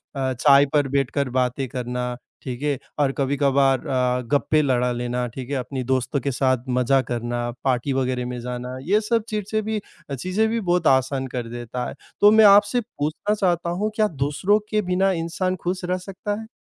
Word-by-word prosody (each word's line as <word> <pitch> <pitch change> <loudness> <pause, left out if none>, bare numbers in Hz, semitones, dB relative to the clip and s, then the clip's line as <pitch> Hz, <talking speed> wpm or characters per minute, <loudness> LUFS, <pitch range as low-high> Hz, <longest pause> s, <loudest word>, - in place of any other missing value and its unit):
अ, 130 -1 -1
चाय 140 +3 +5
पर 145 -2 +3
बैठकर 140 0 0
बातें 125 +1 0
करना, 125 0 -3 0.3
ठीक 125 0 -5
है, 145 -2 0 0.2
और 140 -2 +3
कभी-कभार 135 -1 +2
अ, 125 -1 +1
गप्पे 155 +2 +3
लड़ा 125 -3 +1
लेना, 120 +1 -2
ठीक 125 +2 -8
है, 145 - -1
अपनी 130 +1 -3
दोस्तों 130 +2 0
के 140 +2 -1
साथ 130 -1 +1
मज़ा 125 +2 +3
करना, 120 -1 -3
पार्टी 130 +1 0
वग़ैरह 130 -1 -1
में 125 0 -5
जाना, 125 +1 -5
ये 205 +8 +2
सब 225 0 0
चीज़ 210 -2 -2
से 215 0 +1
भी 215 0 -2 0.3
अ, 140 - -2
चीज़ें 185 - 0
भी 230 - 0
बहुत 175 -5 +1
आसान 130 0 +2
कर 120 -2 -4
देता 120 +1 -5
है। - - -9 0.3
तो 205 +1 +8
मैं 220 0 +7
आपसे 205 +4 +6
पूछना 180 -1 -2
चाहता 175 -4 0
हूँ, 205 +5 -1
क्या 215 -1 +3
दूसरों 150 +6 +1
के 215 -1 +1
बिना 190 +1 +1
इंसान 180 +2 -1
खुश 180 +1 -2
रह 180 +1 0
सकता 195 +3 -5
है? 220 - -10
140 Hz, 195 wpm, -23 LUFS, 125-185 Hz, 0.3 s, तो